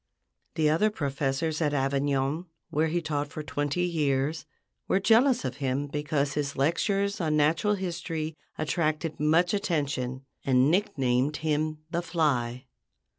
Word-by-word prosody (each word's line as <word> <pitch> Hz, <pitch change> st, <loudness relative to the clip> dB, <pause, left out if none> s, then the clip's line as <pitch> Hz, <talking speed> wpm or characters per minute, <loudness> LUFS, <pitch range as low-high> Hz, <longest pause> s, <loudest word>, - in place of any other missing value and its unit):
The 155 Hz, -1 st, +2 dB
other 165 Hz, +8 st, +3 dB
professors 145 Hz, -1 st, -1 dB
at 145 Hz, -2 st, +1 dB
Avignon, 140 Hz, +4 st, 0 dB, 0.2 s
where 155 Hz, +2 st, +2 dB
he 170 Hz, +2 st, -1 dB
taught 150 Hz, -2 st, -1 dB
for 150 Hz, +2 st, -7 dB
twenty 145 Hz, +5 st, -1 dB
years, 150 Hz, -3 st, 0 dB, 0.4 s
were 190 Hz, -, +3 dB
jealous 235 Hz, -, +4 dB
of 130 Hz, 0 st, -3 dB
him 135 Hz, 0 st, -1 dB
because 145 Hz, 0 st, -1 dB
his 145 Hz, -1 st, -2 dB
lectures 195 Hz, +8 st, +1 dB
on 155 Hz, -2 st, +1 dB
natural 160 Hz, +8 st, +3 dB
history 170 Hz, -4 st, -4 dB, 0.2 s
attracted 155 Hz, 0 st, -1 dB
much 165 Hz, +5 st, +3 dB
attention, 140 Hz, -10 st, -1 dB, 0.2 s
and 130 Hz, +2 st, +4 dB
nicknamed 140 Hz, -7 st, +1 dB
him 155 Hz, 0 st, 0 dB
"the 170 Hz, -, 0 dB
Fly." 140 Hz, -7 st, 0 dB
150 Hz, 130 wpm, -28 LUFS, 140-170 Hz, 0.4 s, jealous